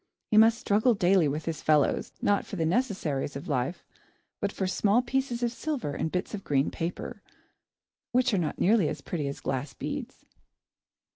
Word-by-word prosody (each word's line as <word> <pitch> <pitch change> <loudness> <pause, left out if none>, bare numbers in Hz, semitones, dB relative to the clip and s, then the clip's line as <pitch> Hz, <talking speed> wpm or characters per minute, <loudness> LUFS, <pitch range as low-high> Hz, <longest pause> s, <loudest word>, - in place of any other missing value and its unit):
He 215 - +4
must 225 +1 +7
struggle 220 +4 +2
daily 185 -3 +4
with 150 +2 -3
his 165 -2 -3
fellows, 150 -2 +2
not 205 0 +3
for - - -7
the 165 -3 0
necessaries 170 - -1
of 140 - -6
life, 140 +4 -1 0.6
but 200 - -1
for 190 - -2
small 205 +5 +2
pieces 250 -1 -1
of 240 - +1
silver 245 - -3
and 160 +2 -2
bits 180 +4 -2
of 200 -2 -5
green 140 -1 +1
paper, 170 +2 -5 0.9
which 255 -1 +2
are 195 - +3
not 160 - -2
nearly 200 -5 +3
as - - -5
pretty 150 -5 -3
as 140 - -5
glass 135 +1 -3
beads. - - -6
185 Hz, 175 wpm, -28 LUFS, 150-225 Hz, 0.9 s, must